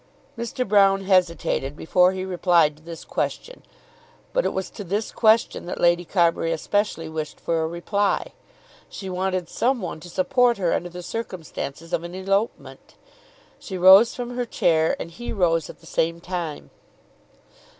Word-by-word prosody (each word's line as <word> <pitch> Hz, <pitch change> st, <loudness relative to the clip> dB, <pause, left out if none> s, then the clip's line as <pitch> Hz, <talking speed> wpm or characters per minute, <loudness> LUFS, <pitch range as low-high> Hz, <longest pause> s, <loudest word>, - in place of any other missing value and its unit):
Mr. 235 Hz, +1 st, -3 dB
Broune 195 Hz, -1 st, +4 dB
hesitated 170 Hz, -7 st, +1 dB
before 180 Hz, +2 st, +3 dB
he 190 Hz, 0 st, -4 dB
replied 175 Hz, -4 st, +3 dB
to 150 Hz, -, -21 dB
this 165 Hz, 0 st, -9 dB
question. -, -, -4 dB, 0.7 s
But -, -, +1 dB
it -, -, +2 dB
was 190 Hz, 0 st, -4 dB
to 205 Hz, -, -8 dB
this 200 Hz, +4 st, -2 dB
question 220 Hz, -5 st, +2 dB
that -, -, -5 dB
Lady 175 Hz, 0 st, +3 dB
Carbury 170 Hz, -2 st, +1 dB
especially 165 Hz, 0 st, -1 dB
wished 155 Hz, -1 st, -5 dB
for 165 Hz, -1 st, -1 dB
a 160 Hz, -, 0 dB
reply. 195 Hz, +4 st, -1 dB, 0.6 s
She 190 Hz, -2 st, -7 dB
wanted 185 Hz, -1 st, -1 dB
some 250 Hz, +8 st, 0 dB
one 180 Hz, -5 st, -5 dB
to 175 Hz, +3 st, -11 dB
support 245 Hz, +6 st, +2 dB
her 180 Hz, -4 st, 0 dB
under 175 Hz, -, -2 dB
the 180 Hz, 0 st, -9 dB
circumstances 170 Hz, -6 st, -6 dB
of 165 Hz, -, 0 dB
an 175 Hz, +1 st, -7 dB
elopement. 195 Hz, +4 st, -3 dB, 0.6 s
She 190 Hz, -, -6 dB
rose 190 Hz, +6 st, +7 dB
from 245 Hz, -1 st, -5 dB
her 245 Hz, 0 st, -1 dB
chair, 160 Hz, -6 st, +2 dB
and 170 Hz, -, -6 dB
he 240 Hz, +8 st, -7 dB
rose 165 Hz, -5 st, +1 dB
at -, -, -12 dB
the -, -, -17 dB
same 165 Hz, +1 st, -1 dB
time. 170 Hz, -4 st, -5 dB
180 Hz, 160 wpm, -23 LUFS, 170-205 Hz, 0.7 s, rose